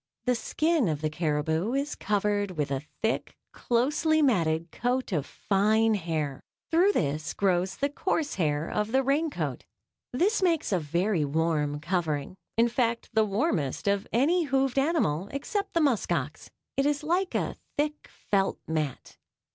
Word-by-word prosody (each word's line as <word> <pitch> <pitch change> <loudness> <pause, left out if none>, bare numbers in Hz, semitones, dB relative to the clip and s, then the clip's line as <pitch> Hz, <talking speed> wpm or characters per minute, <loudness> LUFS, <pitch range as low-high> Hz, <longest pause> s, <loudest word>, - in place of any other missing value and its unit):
The 250 - +3
skin 310 - +1
of 150 -3 -1
the 155 -1 -1
caribou 160 +6 0
is 280 +2 -1
covered 205 -2 -1
with 145 -2 -1
a 135 -1 -1 0.2
thick, 225 - -1
closely 300 +6 +1
matted 165 - +1
coat 250 0 -1
of 150 -6 -1
fine 215 +3 +2
hair; 160 -7 -2 0.3
through 360 +5 +4
this 150 - -1
grows 185 -1 +1
the 280 - +1
coarse 300 0 -1
hair 150 -3 0
of 210 +2 -2
the 265 0 +4
rain 290 +5 +1
coat. - - -4 0.5
This 390 - +1
makes 335 - +1
a 185 - +2
very 170 +3 0
warm 150 -1 0
covering 160 -1 -2 0.2
in 230 +1 +5
fact 235 -1 -1
the 220 0 +4
warmest 195 - -1
on 200 0 +1
any 320 +9 +3
hoofed 270 -1 +1
animal 235 - +1
except 395 +9 -3
the 335 - +4
musk 260 - +1
ox. 150 -3 -2 0.3
It 275 +1 +2
is 290 0 0
like 355 +4 0
a - - -1 0.2
thick, 300 +1 -1
felt 195 -1 0
mat. 155 -4 -3
210 Hz, 155 wpm, -28 LUFS, -, 0.5 s, in